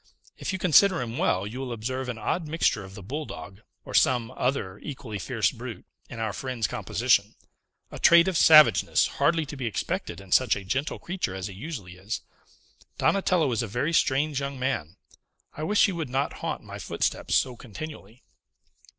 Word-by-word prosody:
If - - -4
you 190 - -2
consider 185 +1 +5
him 120 -1 -4
well, 95 +2 +1
you 115 +5 -6
will 130 -2 -4
observe 125 +3 -3
an 120 - -4
odd 160 +8 -2
mixture 150 -9 +1
of 95 0 -11
the 100 - -9
bulldog, 110 -5 -7 0.2
or - - -9
some 120 -3 +3
other 115 -8 -2
equally 130 -7 -7
fierce - - 0
brute, - - -8 0.2
in - - -8
our 110 -2 -2
friend's 125 0 -3
composition; - - +1 0.6
a - - -8
trait 170 +1 +7
of 190 - 0
savageness 155 - +6
hardly 165 -2 +3
to 145 - -8
be 130 -4 -3
expected 95 -4 -3
in 95 -2 -14
such 130 -4 +4
a 100 - -7
gentle 130 +10 -2
creature 175 - -4
as 95 -1 -5
he 100 - -6
usually 100 - -7
is. 100 +4 -4 0.8
Donatello 180 -7 +2
is 115 - 0
a 115 - -3
very 125 +11 -1
strange 145 -1 +2
young 140 -1 -4
man. 125 - -2 0.6
I - - -7
wish 205 +7 +4
he - - 0
would 165 -6 -4
not 135 +3 -1
haunt - - -3
my - - -9
footsteps - - -1
so 125 -2 +2
continually." 120 -1 -10
130 Hz, 185 wpm, -26 LUFS, 105-155 Hz, 0.8 s, trait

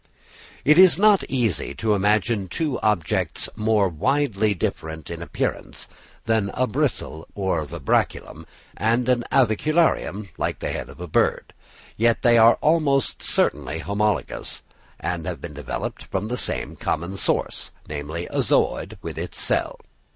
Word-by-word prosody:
It 155 +4 +6
is 185 -3 +7
not 205 0 +5
easy 120 - -1
to 110 -1 +1
imagine 105 +1 +1
two 145 - -2
objects 105 -7 0
more 105 -2 +2
widely 110 - +1
different 80 -2 -4
in 85 0 -6
appearance 85 - -4 0.4
than 110 -3 +1
a 130 - +2
bristle 80 -7 -2
or 95 -5 0
vibraculum, 70 - -2 0.3
and 115 +5 +1
an 125 -2 +2
avicularium 130 - +2
like - - -1
the - - -4
head - - -5
of - - -13
a 90 - -5
bird; 75 - 0 0.4
yet 115 +1 +2
they 120 -1 +6
are 115 +1 +7
almost 150 -4 +2
certainly 75 +1 0
homologous 100 +4 -2 0.4
and 85 -3 -3
have 90 -5 -4
been 75 +1 -8
developed 75 -2 -5
from 95 +3 -3
the 125 - -1
same - - -1
common 85 +4 -2
source, 95 - -1 0.2
namely 75 +3 -5
a - - +1
zooid - - 0
with - - -5
its - - -5
cell. - - +1
105 Hz, 145 wpm, -23 LUFS, 85-125 Hz, 0.4 s, is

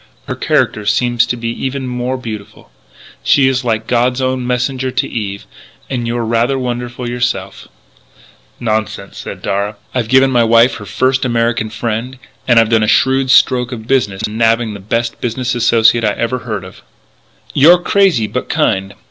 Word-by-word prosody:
Her - - -2
character 110 - 0
seems 120 +3 +2
to 120 - -2
be 115 0 -3
even 135 0 -3
more 125 +1 -3
beautiful.... 110 - -9 0.5
She's 130 - +3
like 110 -2 -1
God's 125 +2 +1
own 130 -1 -1
messenger 125 +1 -1
to 130 - -1
Eve.... 100 -3 -5 0.5
And 120 -3 -2
you're 120 0 -2
rather 115 +4 +1
wonderful 125 -1 -4
yourself 120 -6 -3 0.4
" - - -28
"Nonsense," 110 -3 -3
said - - -8
Darragh, 100 +2 -2 0.2
"I've 125 -3 -1
given 130 +1 +4
my 120 -2 +3
wife 115 +2 +4
her 105 - -10
first 130 +1 +1
American 115 -2 0
friend 115 +3 -4 0.3
and 120 -2 +5
I've 115 -1 +3
done 115 -1 +3
a 110 - +1
shrewd 130 +3 +2
stroke 125 -1 +4
of 110 -3 -7
business 115 -7 0
in 110 +2 -6
nabbing 115 -1 +2
the 100 - -8
best 115 +4 -2
business 120 +1 -2
associate 115 -1 +3
I 105 -1 +2
ever 115 +4 -2
heard 110 -5 -5
of 95 - -12 0.4
" - - -25
"You're 165 +6 +7
crazy 180 - +2
but - - -4
kind.... 95 +1 0
120 Hz, 175 wpm, -15 LUFS, 110-130 Hz, 0.5 s, You're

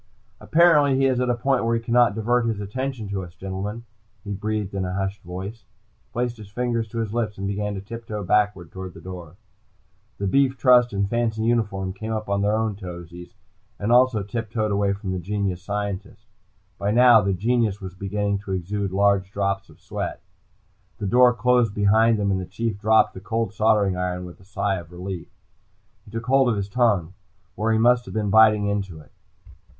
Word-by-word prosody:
"Apparently 150 -5 +4
he 135 - +3
is 130 -2 +2
at 125 0 0
a 120 - +2
point 125 +1 +1
where 115 0 +1
he - - +1
cannot 115 -2 +3
divert 115 +2 +1
his 110 -3 -1
attention 120 +2 -4
to 100 -1 -3
us, 85 -1 -11
gentlemen," 95 +5 -5 0.4
he 100 -1 -4
breathed 105 0 -3
in 100 -1 -2
a 90 0 -3
hushed 95 +1 -3
voice. 95 +5 -7 0.4
He - - -40
placed 120 0 -2
his 105 -2 -11
fingers 115 0 -1
to 115 - -8
his 110 -2 -2
lips 110 -3 -2
and 95 - -4
began 100 +1 -2
to 95 - -5
tip 115 +3 -9
toe 105 -1 -4
backwards 100 -4 +1
toward 95 -1 -7
the - - -10
door. 90 -3 -9 0.8
The 100 - -3
beef 135 +6 +2
trust 125 -2 +5
in 100 0 0
fancy 110 +1 -1
uniform 105 -5 0
came 110 +3 -6
up 110 -2 -3
on 100 0 +1
their 105 +1 +2
own 110 -2 -1
toesies, 90 -2 -9 0.4
and 105 +3 -1
also 120 -4 +4
tiptoed 110 +1 -3
away 100 0 +1
from 100 -1 -5
the 95 - -2
genius 95 0 -2
scientist. 100 +1 -5 0.5
By 100 +1 -1
now, 120 0 +7
the 100 -1 0
genius 110 +1 0
was 95 -2 -7
beginning 100 +1 -2
to 100 -1 -6
exude 95 +2 -2
large 100 -1 +2
drops 100 0 -2
of - - -18
sweat. - - -5 0.8
The 105 - -4
door 125 +5 +5
closed 120 -3 +2
behind 110 +2 +4
them, 100 -1 0
and 95 -1 0
the - - -5
Chief 110 +1 -3
dropped 110 +1 +4
the - - -8
cold 110 0 -2
soldering 105 -4 +2
iron 90 0 -3
with 90 - -11
a 95 - -19
sigh 100 0 -1
of 85 -1 -13
relief. 90 0 -6 0.8
He - - -15
took 115 +1 -5
hold 135 0 +4
of 115 - +1
his 100 0 -3
tongue, 100 -7 +1 0.4
where 110 +5 -1
he 110 - +3
must 120 +2 +4
have - - -9
been 105 -2 0
biting 110 -1 +6
into 100 -5 -2
it. 75 - -17
105 Hz, 205 wpm, -23 LUFS, 95-115 Hz, 0.8 s, now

